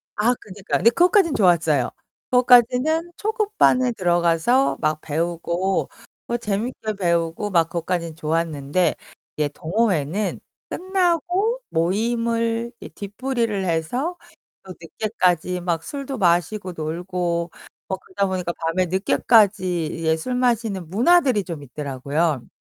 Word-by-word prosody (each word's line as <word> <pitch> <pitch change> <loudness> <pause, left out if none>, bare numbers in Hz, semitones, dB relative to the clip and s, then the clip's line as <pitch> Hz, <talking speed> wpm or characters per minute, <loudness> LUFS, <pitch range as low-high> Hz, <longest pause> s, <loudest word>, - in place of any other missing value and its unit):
아 225 +4 +2
그니까. 195 0 -3
근데 230 - +5
그것까진 355 - +4
좋았어요. 160 - +3 0.4
그것까지는 250 +7 +4
초급반에 420 - +2
들어가서 175 +7 +2
막 155 0 0
배우고 170 +4 -1 0.4
뭐 240 - -1
재밌게 215 +1 -3
배우고 170 +3 0
막 170 -4 +3
그것까진 170 -1 -3
좋았는데. 160 0 0 0.4
이제 150 -1 0
동호회는 185 +1 -1 0.3
끝나고 370 +5 0
모임을 230 +5 0
이 - - -7
뒤풀이를 215 -1 -3
해서 245 - -1 0.5
또 185 -1 -9
늦게까지 180 -1 -1
막 170 -2 -2
술도 275 -3 -5
마시고 180 +1 +1
놀고 170 +1 -2 0.4
뭐 190 - -2
그러다 195 +1 -2
보니까 180 -2 -2
밤에 165 +3 -1
늦게까지 190 -1 +2
이제 160 -1 +1
술 250 +10 -3
마시는 225 -8 0
문화들이 245 - +3
좀 165 -6 -6
있더라고요. 140 0 -2
190 Hz, 285 characters per minute, -22 LUFS, 170-240 Hz, 0.5 s, 근데